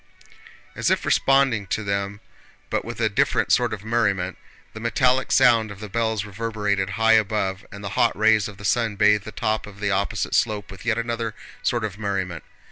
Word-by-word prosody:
As - - 0
if - - +1
responding 135 -7 +3
to 110 - -2
them 100 +1 -3 0.5
but - - 0
with - - -7
a - - +3
different - - +1
sort - - +3
of 105 0 -6
merriment, 100 -6 0 0.3
the 110 - -8
metallic 125 +2 +1
sound 115 -2 +5
of 100 -1 -9
the 105 -1 -7
bells 110 0 -1
reverberated 105 -2 -2
high 115 0 +4
above 105 -3 0
and 100 +1 -9
the 100 - -4
hot 115 +3 +1
rays 110 -1 +4
of 105 -2 -11
the 100 - -9
sun 115 0 +1
bathed 105 0 +3
the 110 - -7
top 110 0 -2
of 105 0 -13
the 105 0 0
opposite 100 +3 -1
slope 105 -3 0
with 95 +3 -11
yet 115 -1 +2
another 115 -1 -3 0.3
sort 120 -2 0
of 105 -1 -4
merriment. 95 -5 -3
105 Hz, 195 wpm, -23 LUFS, 100-115 Hz, 0.5 s, sound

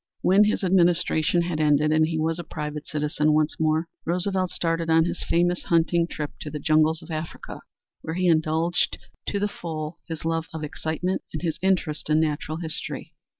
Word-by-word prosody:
When 195 +3 +5
his 210 - 0
administration 175 -2 +3
had 170 -2 -2
ended 150 0 +3
and 155 0 +4
he 160 -1 -2
was 160 +2 0
a - - -4
private 150 -1 -5
citizen 150 0 +1
once 155 0 +1
more, 160 +1 +2 0.2
Roosevelt 185 +2 0
started 165 -1 -1
on 160 0 +5
his 175 - -3
famous 175 +1 +1
hunting 170 0 +2
trip 150 -3 -4
to 150 - -5
the 150 - -5
jungles 155 +2 +2
of - - -10
Africa, 155 +1 -6 0.4
where 160 - -4
he 185 0 +1
indulged 160 +1 +2 0.3
to 200 - -1
the 205 - +1
full 160 -4 -6
his 160 -1 -6
love 165 0 -1
of 160 - -4
excitement 160 +5 -2
and 155 - -4
his 165 -3 -2
interest 180 -6 0
in 155 0 +4
natural 155 0 -1
history. 160 -2 -5
160 Hz, 185 wpm, -25 LUFS, 155-175 Hz, 0.4 s, When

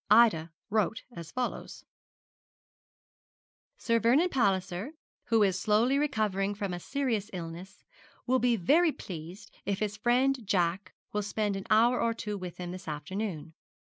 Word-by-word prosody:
Ida 210 -7 +5 0.2
wrote 215 0 +1
as 165 -1 -8
follows: 250 -1 -4 1.9
'Sir 230 -1 +1
Vernon 265 - +4
Palliser, 200 - 0 0.3
who 225 -2 +3
is 190 -2 +2
slowly 230 +8 +3
recovering 210 -8 0
from 200 -3 -3
a 175 - -4
serious 235 -3 -1
illness, 175 +2 -8 0.4
will 255 +1 +3
be 245 -1 +3
very 310 - +4
pleased 175 - -9
if 200 -1 -1
his 210 0 -2
friend 255 +4 +2
Jack 185 -1 0 0.2
will 210 - 0
spend 210 0 -1
an 195 - -6
hour 235 +3 +4
or 230 -1 +1
two 210 -2 -4
with 180 -3 -7
him 175 -1 -5
this 185 -1 -9
afternoon. 160 +2 -4
210 Hz, 140 wpm, -30 LUFS, 185-235 Hz, 1.9 s, Ida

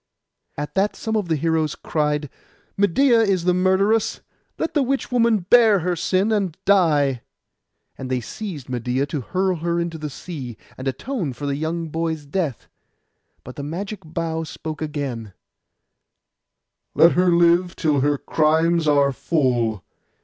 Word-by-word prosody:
At 145 0 -4
that 195 +2 +1
some 220 -1 -3
of 210 -4 0
the 160 - +1
heroes 160 0 0
cried, 150 -1 -1 0.5
'Medeia 230 +6 +4
is 195 -5 +1
the 180 0 +3
murderess. 190 +4 +2 0.4
Let 325 0 -2
the 295 - +2
witch 270 0 -1
woman 230 -4 +3
bear 215 +1 +5
her 180 +1 0
sin, 190 +5 +1
and 195 -6 0
die!' 150 -10 +3 0.8
And 130 - -5
they 130 -1 0
seized 165 - -7
Medeia, 125 +2 -1
to 145 -1 -4
hurl 185 +7 -1
her 170 +1 -1
into 170 -1 -3
the 150 0 -4
sea, 135 -7 -7 0.2
and 130 - -6
atone 160 - -3
for 135 +4 -7
the 140 -1 -1
young 160 +2 -3
boy's 160 -1 -3
death; 150 - -3 0.8
but 130 - -11
the - - -4
magic 195 +7 -5
bough 160 0 -3
spoke 155 -1 -7
again, 135 -9 -4 1.6
'Let 170 +1 +7
her 180 0 +3
live 175 +1 +3
till 150 -3 +1
her 145 +2 +2
crimes 160 +3 +2
are 140 -1 +4
full. 120 - 0
165 Hz, 150 wpm, -22 LUFS, 145-190 Hz, 1.6 s, Let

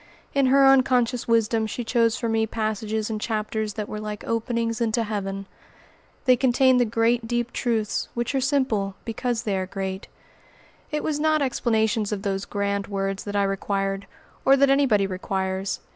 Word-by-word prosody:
In 275 -2 +3
her 275 +1 +5
unconscious 250 -2 +3
wisdom 225 -1 +2
she 240 +3 -4
chose 230 0 +2
for 235 - -2
me 225 0 +1
passages 220 0 -2
and 215 -1 -3
chapters 215 -1 -2
that 210 -2 -3
were 215 - -5
like 210 -1 -6
openings 230 0 -1
into 230 0 +1
heaven. 195 -2 -4 0.8
They 255 -2 +6
contained 260 0 +4
the 245 - +4
great, 230 +1 +1
deep 240 0 -1
truths 225 -4 -1
which 240 +3 -2
are 270 - +1
simple 250 -8 0
because 235 0 -2
they 205 -3 -1
are 185 -1 -2
great. 190 0 -5 0.8
It 300 0 -2
was 300 -2 -1
not 310 -1 +2
explanations 220 -4 0
of 200 -2 -3
those 195 -1 -2
grand 200 -1 -2
words 195 -1 -3
that 205 0 -5
I 200 - +3
required, 195 0 -2 0.4
or 270 +1 +5
that 275 0 +4
anybody 255 -8 +3
requires. 190 0 -3
220 Hz, 170 wpm, -24 LUFS, 200-245 Hz, 0.8 s, They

